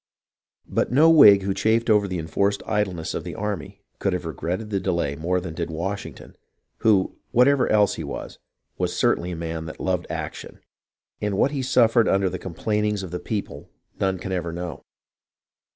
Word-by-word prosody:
But - - -1
no 155 +6 +6
Whig 105 -11 +8
who 95 0 0
chafed 115 +3 +1
over 105 -3 +4
the 90 -1 -3
enforced 100 +5 -1
idleness 95 -6 -1
of - - -4
the - - -7
army 105 -4 -5 0.2
could 100 - 0
have 90 -1 -3
regretted 90 +7 -4
the 100 - +1
delay 85 -7 -1
more 90 +4 0
than 90 -3 -6
did 85 0 -4
Washing 95 +5 -4
ton, - - -14 0.4
who, 100 -4 +2
whatever 130 +2 +4
else 105 -1 +4
he - - -4
was, 70 - -7 0.4
was - - -1
certainly 90 - +1
a 90 - -4
man 80 -1 -4
that 80 - -9
loved 90 -2 -1
action; - - -6 0.6
and 105 -2 -1
what 135 - +3
he 140 -2 -2
suffered 120 -3 +4
under 95 -1 +2
the 95 - -5
complainings 105 +3 -1
of 90 - -7
the 90 - -3
people 100 +3 -5 0.3
none 95 -1 +1
can 95 +2 -6
ever 85 -2 -2
know. 85 0 -6
95 Hz, 185 wpm, -24 LUFS, 85-105 Hz, 0.6 s, Whig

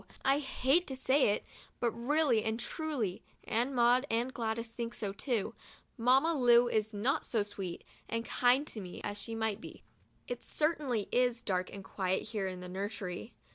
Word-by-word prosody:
I 275 +1 +4
hate 275 +4 +2
to 265 - -4
say 265 -1 +3
it, 205 - 0 0.3
but 240 -1 +1
really 245 -1 +2
and 220 +1 -1
truly 260 - -2 0.2
(and 245 +4 0
Maud 245 +3 +4
and 240 +3 0
Gladys 230 0 -3
think 235 0 -4
so, 200 -2 -3
too), 230 0 -1 0.4
Mamma 265 +7 +4
Lu 245 -4 +6
is 220 -2 0
not 240 +9 0
so 220 -4 +1
sweet 195 -4 -6 0.3
and 230 0 -2
kind 250 +5 +3
to 225 -8 -5
me 180 -2 -8
as 205 0 -3
she 230 - -4
might 220 -1 -1
be. - - -10 0.4
It - - -4
certainly 295 -9 0
is 245 -1 +2
dark 185 -2 -1
and 195 -1 -8
quiet 190 -1 -1
here 210 -3 -2
in 185 -1 -5
the 180 - -6
nursery. 195 +1 -5
230 Hz, 175 wpm, -33 LUFS, 205-260 Hz, 0.4 s, Lu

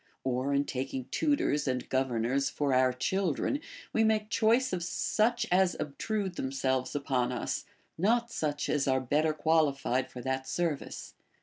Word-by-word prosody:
Or, 130 +1 0
in 140 0 +2
taking 130 -1 -3
tutors 285 - +1
and 125 -1 -1
governors 130 +1 0
for 145 -2 0
our 130 0 +4
children, 190 - 0 0.3
we 225 - +3
make 215 0 +1
choice 235 +1 +3
of 180 - -1
such 225 +6 +1
as 185 0 +3
obtrude 190 +6 -3
themselves 130 0 -1
upon 130 -3 0
us, 125 - -3 0.3
not 235 +5 +2
such 150 -7 -2
as 145 -2 +1
are 130 -1 +3
better 150 +5 +1
qualified 150 -5 +1
for 125 - -8
that 130 +1 -2
service. 165 -2 -3
145 Hz, 145 wpm, -30 LUFS, 130-190 Hz, 0.3 s, our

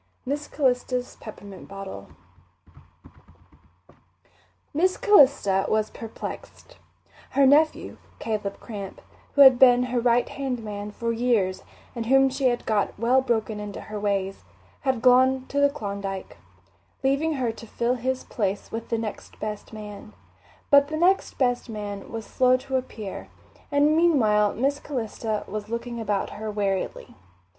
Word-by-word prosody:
Miss 290 +3 -3
Calista's 250 -2 -1
Peppermint 200 -3 -10
Bottle 195 0 -8 2.7
Miss 365 +5 +2
Calista 260 - +4
was 215 0 +1
perplexed. 225 -1 -9 0.6
Her 280 - +6
nephew, 300 +3 +3 0.2
Caleb 210 -3 -3
Cramp, 200 -4 -8 0.4
who 285 - +6
had 265 -3 +9
been 250 -1 +7
her 245 - +2
right 240 0 +2
hand 260 -4 -4
man 205 -1 -5
for 230 +2 -3
years 225 -6 +1 0.3
and 230 -2 -4
whom 270 +1 +5
she 265 +1 -2
had 240 -1 +1
got 210 -2 0
well 245 +5 +3
broken 225 -4 -1
into 210 -1 -6
her 215 0 -7
ways, 195 -1 -2 0.4
had 260 -4 -1
gone 260 +1 +5
to 285 - -1
the 285 0 +5
Klondike, 200 -7 -5 0.7
leaving 275 +4 +1
her 255 -5 -1
to 225 +1 -12
fill 235 +3 0
his 255 +1 -2
place 200 -4 -3
with 225 0 -5
the 230 - 0
next 225 -2 -6
best 210 -1 -5
man; 210 - -9 0.6
but 280 0 +7
the 310 +1 -3
next 370 +4 +2
best 245 -2 0
man 205 -2 -6
was 225 -1 -5
slow 255 0 +3
to 265 +1 -5
appear, 225 -6 -5 0.4
and 290 +2 +4
meanwhile 220 -12 +3
Miss 275 +5 0
Calista 225 -5 -3
was 210 0 -6
looking 235 +1 -4
about 205 -3 -1
her 215 +1 -6
warily. 200 -2 -3
235 Hz, 140 wpm, -25 LUFS, 210-265 Hz, 2.7 s, had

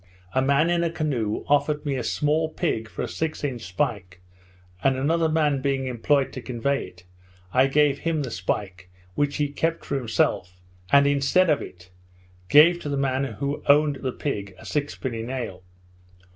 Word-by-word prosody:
A 130 - +2
man 140 +5 +3
in 170 0 +2
a 170 - +1
canoe 135 -10 -2
offered 150 +1 +1
me 140 -2 -1
a 125 - -2
small 150 +6 0
pig 115 -10 -2
for - - -5
a - - -2
six 160 -1 -3
inch 130 -5 -3
spike, 90 -2 -3 0.6
and 135 -1 +3
another 160 +4 +1
man 150 -3 +1
being 135 -1 0
employed 130 +3 +1
to 130 - -6
convey 130 +3 -1
it, 90 0 -17 0.5
I 130 +1 +5
gave 145 0 +2
him 160 -3 -1
the 125 - -5
spike, 90 -1 -4 0.2
which 145 +6 0
he 145 -2 0
kept 165 +3 -2
for 140 - -1
himself, 90 -6 -1 0.3
and 140 0 +6
instead 145 +5 +3
of 150 - +1
it, 90 0 -11 0.6
gave 165 +4 +7
to 150 - -5
the 140 - -1
man 135 0 0
who 140 +4 -4
owned 145 0 +4
the 130 -1 -3
pig 100 -9 -4
a - - -14
sixpenny 130 -5 -3
nail. 115 -6 -5
140 Hz, 175 wpm, -24 LUFS, 120-150 Hz, 0.6 s, gave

